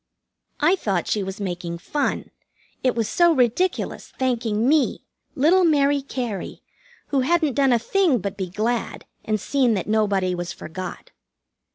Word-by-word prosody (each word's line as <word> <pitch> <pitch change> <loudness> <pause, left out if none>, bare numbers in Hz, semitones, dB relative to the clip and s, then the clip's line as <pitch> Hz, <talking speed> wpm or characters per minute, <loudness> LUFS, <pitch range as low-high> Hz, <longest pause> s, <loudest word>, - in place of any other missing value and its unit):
I 320 +5 +4
thought 195 - -1
she 210 - 0
was 190 +1 -5
making 175 -3 -4
fun, 290 - -2 0.5
it 255 -2 +2
was 225 -3 0
so 345 -1 +4
ridiculous, 265 +8 0
thanking 235 -3 0
me, 300 0 +2 0.3
little 340 +7 +4
Mary 285 -3 +3
Cary, 245 -7 -5 0.5
who 280 - +1
hadn't 310 +1 +2
done 270 +1 +3
a 240 - +5
thing 325 - +2
but 200 -1 -4
be 190 -2 -4
glad 225 +5 -2 0.2
and 215 -1 -1
seen 255 -1 +1
that 190 - -2
nobody 200 -4 +1
was 175 -1 -4
forgot. 185 +3 -8
235 Hz, 150 wpm, -23 LUFS, 200-285 Hz, 0.5 s, a